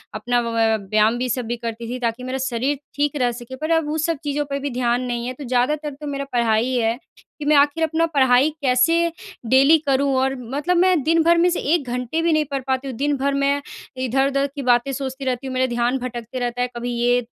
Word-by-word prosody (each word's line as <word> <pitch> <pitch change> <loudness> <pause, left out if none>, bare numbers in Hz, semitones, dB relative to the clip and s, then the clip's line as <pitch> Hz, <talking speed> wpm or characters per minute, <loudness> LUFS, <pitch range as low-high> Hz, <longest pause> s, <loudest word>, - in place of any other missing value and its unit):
अपना 245 +3 -1
अ, 230 -1 +1
व्यायाम 215 +3 +1
भी 250 0 -2
सब 245 0 -1
भी 240 - -2
करती 230 0 -5
थी 255 - -4
ताकि 235 +1 -2
मेरा 255 +1 -3
शरीर 265 +2 -1 0.2
ठीक 290 +1 0
रह 250 -3 +1
सके 240 +2 -8
पर 310 +5 -3
अब 305 -2 -2
उस 310 0 -1
सब 330 -3 0
चीज़ों 290 0 -1
पे 280 0 -2
भी 285 - -3
ध्यान 245 0 0
नहीं 240 -1 -3
है। 255 - -3
तो 280 +3 -10
ज़्यादातर 270 +5 0
तो 295 - -5
मेरा 280 0 -3
पढ़ाई 235 +1 +2
है 230 -1 +1 0.4
कि 295 - -5
मैं 300 - +4
आख़िर 290 +3 +3
अपना 320 +1 +1
पढ़ाई 260 0 +4
कैसे 310 +6 +3 0.4
डेली 275 +5 +6
करूँ 275 0 +2
और 265 +1 +1
मतलब 285 +9 -1
मैं 360 -3 +4
दिन 325 +1 +3
भर 340 +1 +4
में 350 +1 +4
से 355 - -1
1 290 -7 0
घंटे 250 +6 -2
भी 335 -1 +2
नहीं 310 -1 +2
पढ़ 275 - -1
पाती 260 +1 -1
हूँ। 255 - -5
दिन 290 +2 +1
भर 275 +1 0
मैं 280 +1 +1 0.4
इधर-उधर 275 +2 +1
की 285 - -4
बातें 245 +1 +2
सोचती 265 0 -5
रहती 255 +1 -2
हूँ 260 - -5
मेरा 255 0 +2
ध्यान 240 +2 +1
भटकता 245 0 -6
रहता 245 0 -2
है 250 - +1
कभी 245 +1 -3
ये 245 +1 +3
260 Hz, 235 wpm, -21 LUFS, 245-290 Hz, 0.4 s, डेली